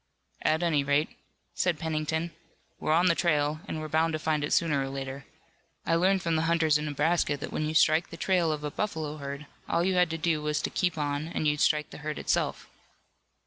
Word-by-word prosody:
"At 160 Hz, +2 st, +1 dB
any 155 Hz, -5 st, +2 dB
rate," 145 Hz, +2 st, +2 dB, 0.4 s
said 175 Hz, -3 st, 0 dB
Pennington, 160 Hz, +1 st, -2 dB, 0.5 s
"we're -, -, -1 dB
on 170 Hz, +3 st, +4 dB
the 175 Hz, -, +5 dB
trail, 150 Hz, -3 st, +1 dB
and 160 Hz, -, -4 dB
we're 155 Hz, -, -4 dB
bound 160 Hz, +1 st, +1 dB
to -, -, 0 dB
find 155 Hz, -1 st, 0 dB
it 145 Hz, -, -2 dB
sooner 150 Hz, -5 st, +2 dB
or 135 Hz, -, -3 dB
later. 135 Hz, 0 st, -6 dB, 0.6 s
I -, -, +1 dB
learned 185 Hz, +3 st, +3 dB
from 165 Hz, -1 st, +1 dB
the 155 Hz, -, +2 dB
hunters 160 Hz, -3 st, +3 dB
in 150 Hz, -, -3 dB
Nebraska 150 Hz, +1 st, +1 dB
that 140 Hz, -, -6 dB
when 155 Hz, -, -1 dB
you 155 Hz, -, -3 dB
strike 155 Hz, +2 st, +4 dB
the 165 Hz, -, -9 dB
trail 175 Hz, -3 st, +2 dB
of 150 Hz, -1 st, -3 dB
a 150 Hz, -, -3 dB
buffalo 160 Hz, -7 st, -3 dB
herd, 140 Hz, 0 st, -6 dB, 0.2 s
all 170 Hz, -, +2 dB
you 190 Hz, +1 st, +1 dB
had 180 Hz, -1 st, +3 dB
to 165 Hz, -, -3 dB
do 160 Hz, -1 st, 0 dB
was 150 Hz, 0 st, 0 dB
to -, -, -1 dB
keep 180 Hz, -3 st, 0 dB
on 145 Hz, 0 st, -2 dB
and 165 Hz, -2 st, -1 dB
you'd 150 Hz, 0 st, +1 dB
strike 150 Hz, -1 st, +2 dB
the -, -, -9 dB
herd 150 Hz, 0 st, -4 dB
itself." -, -, -1 dB
155 Hz, 225 wpm, -28 LUFS, 150-165 Hz, 0.6 s, the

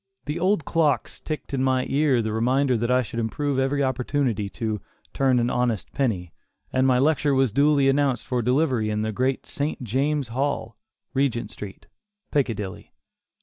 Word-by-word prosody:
The 150 Hz, +3 st, -3 dB
old 185 Hz, -3 st, +1 dB
clocks 155 Hz, -4 st, +1 dB
ticked 155 Hz, -2 st, -6 dB
in 130 Hz, -1 st, +1 dB
my 130 Hz, -1 st, +2 dB
ear 135 Hz, -4 st, +2 dB
the 110 Hz, 0 st, -2 dB
reminder 130 Hz, +4 st, +2 dB
that 120 Hz, +1 st, -1 dB
I 125 Hz, 0 st, +3 dB
should 115 Hz, +1 st, -5 dB
improve 135 Hz, +5 st, -1 dB
every 140 Hz, +2 st, +1 dB
opportunity 125 Hz, -5 st, 0 dB
to 110 Hz, -2 st, -3 dB, 0.3 s
"turn 135 Hz, -2 st, +3 dB
an 120 Hz, 0 st, +1 dB
honest 120 Hz, -4 st, -1 dB
penny," 95 Hz, -, -1 dB, 0.4 s
and 130 Hz, 0 st, +3 dB
my 130 Hz, -1 st, +4 dB
lecture 145 Hz, +1 st, +2 dB
was 130 Hz, -3 st, +3 dB
duly 140 Hz, +2 st, +4 dB
announced 135 Hz, -3 st, +2 dB
for 125 Hz, -1 st, 0 dB
delivery 125 Hz, -2 st, +1 dB
in 105 Hz, 0 st, -1 dB
the 110 Hz, -, -1 dB
great 130 Hz, +5 st, -1 dB
St. 145 Hz, -2 st, -3 dB
James' 135 Hz, +3 st, 0 dB
Hall, 125 Hz, -2 st, -2 dB, 0.4 s
Regent 135 Hz, -4 st, 0 dB
Street, 100 Hz, -2 st, -9 dB, 0.5 s
Piccadilly. 110 Hz, -, -2 dB
130 Hz, 165 wpm, -24 LUFS, 115-140 Hz, 0.5 s, my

